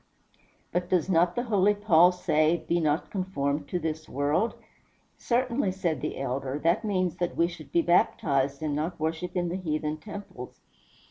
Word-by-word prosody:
"But 175 +1 -1
does 180 -1 +1
not 175 +1 +3
the 240 - 0
holy 205 -3 +3
Paul 180 -4 +5
say, 160 -2 +1
'Be 170 - +2
not 155 0 0
conformed 150 -7 -2
to 180 - -2
this 160 -1 -4
world'?" 145 - 0 0.6
"Certainly," 240 -4 0
said 170 -7 -2
the - - -3
elder; 135 +1 -2
"that 170 +7 +2
means 185 -5 0
that 175 -1 -2
we 170 - +4
should 165 -4 -10
be 170 - +3
baptized, 140 -4 +1
and 150 -2 -1
not 155 +4 -3
worship 165 +3 -3
in 175 -1 0
the 180 - -2
heathen 155 -3 -2
temples." 200 - -9
170 Hz, 165 wpm, -27 LUFS, 155-185 Hz, 0.6 s, Paul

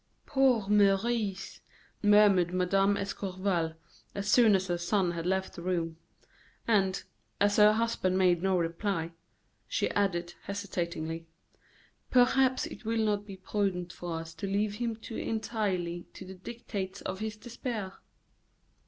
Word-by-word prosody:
"Poor 260 -7 +3
Maurice!" 205 0 +1 0.4
murmured 205 -4 +5
Mme. 195 +2 +3
d'Escorval, 185 -4 -2 0.4
as 200 0 -3
soon 220 0 +6
as 190 0 +1
her 175 -2 -1
son 180 0 +1
had 170 0 -4
left 190 0 0
the - - -8
room. 170 -2 -2 0.7
And, 195 -4 +2 0.4
as 205 0 +3
her 210 0 +7
husband 220 -5 0
made 180 -2 +3
no 190 0 +2
reply: 170 +3 -1
"Perhaps," 165 +1 -8 0.5
she - - 0
added, 175 -4 0
hesitatingly, 170 -5 -4 0.8
"perhaps 260 +1 +4
it - - -9
will 225 0 0
not 205 -1 0
be 195 -2 -8
prudent 185 -3 -2
for 170 -2 -4
us 165 0 -8
to 165 +5 -5
leave 205 +1 0
him 235 -1 -2
too 225 +1 -8
entirely 200 -6 -2
to 190 - -9
the 190 - -8
dictates 195 -1 -6
of 190 0 -4
his 215 0 -4
despair." 230 -4 -5
195 Hz, 140 wpm, -30 LUFS, 180-215 Hz, 0.8 s, her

